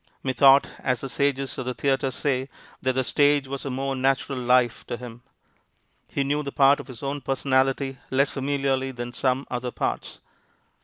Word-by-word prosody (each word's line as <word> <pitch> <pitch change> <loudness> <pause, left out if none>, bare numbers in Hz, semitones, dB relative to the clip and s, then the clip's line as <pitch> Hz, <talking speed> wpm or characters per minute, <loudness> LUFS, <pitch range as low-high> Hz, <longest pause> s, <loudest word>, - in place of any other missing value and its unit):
Methought, 135 +1 +5
as 125 -3 -1
the 135 - -5
sages 140 0 -1
of 130 - -4
the 125 - -2
theatre 135 -1 +1
say, 130 0 -1 0.3
that 130 0 +1
the 130 +1 +1
stage 145 +1 +3
was 135 +1 -5
a - - -2
more 135 +1 -2
natural 135 0 0
life 125 -1 +2
to 120 - -4
him. 120 -1 -10 0.9
He 140 - -1
knew 145 +2 0
the 140 -2 -5
part 140 +1 +5
of - - -8
his 130 -2 -10
own 140 +1 -3
personality 135 0 0
less 140 +2 +2
familiarly 135 -1 -1
than 120 0 -6
some 130 +1 0
other 125 0 -2
parts. - - -3
135 Hz, 175 wpm, -25 LUFS, 130-140 Hz, 0.9 s, Methought